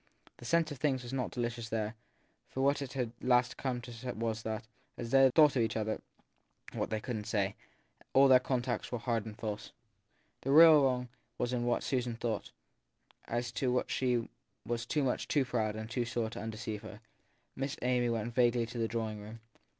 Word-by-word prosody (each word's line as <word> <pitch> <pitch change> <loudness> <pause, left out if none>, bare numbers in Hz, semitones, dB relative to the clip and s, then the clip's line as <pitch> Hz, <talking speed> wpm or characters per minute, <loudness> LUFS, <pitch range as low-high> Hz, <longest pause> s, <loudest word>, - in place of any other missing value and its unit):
The - - -12
sense 165 +2 +2
of 145 - -7
things 135 -3 +1
was 120 +1 -7
not 130 -2 -1
delicious 120 -2 -3
there, 110 -1 -1 0.6
for 130 - -3
what 140 +1 +3
it 135 -1 -5
had 125 -4 -2
at - - -5
last 125 0 +4
come 125 -2 -2
to 120 0 -6
was 115 0 -2
that, 110 0 -3 0.3
as 120 -1 -5
they 135 -1 +7
thought 150 -3 +7
of 125 - +3
each 110 -1 0
other 110 0 -2 0.7
what - - -2
they 110 - -1
couldn 110 -1 -4
t 105 - -10
say, 100 -2 0 0.6
all 135 +1 +6
their 130 -1 +8
contacts 125 -2 -2
were 120 - -1
hard 115 -2 -1
and 105 0 -8
false. 105 -2 -5 0.7
The 135 - -4
real 155 0 +9
wrong 125 -2 +1 0.3
was 125 0 -1
in 120 -1 0
what 120 - +1
Susan 125 -3 -1
thought 115 -2 -3 0.8
as 120 +1 -2
to 130 -2 0
which 125 - 0
she 125 -3 +1 0.4
was 120 0 -2
much 135 -4 +1
too 145 -3 +2
proud 110 -4 -1
and 110 0 -5
too 120 +1 -1
sore 115 -2 -2
to - - -6
undeceive 110 -1 -5
her. 110 -1 -10 0.6
Miss 135 +1 -3
Amy 125 -1 +2
went 115 0 -2
vaguely 120 -1 +3
to 120 +1 -7
the 115 - +1
drawing 110 -2 -3
room. 110 +2 -9
120 Hz, 200 wpm, -32 LUFS, 110-130 Hz, 0.8 s, real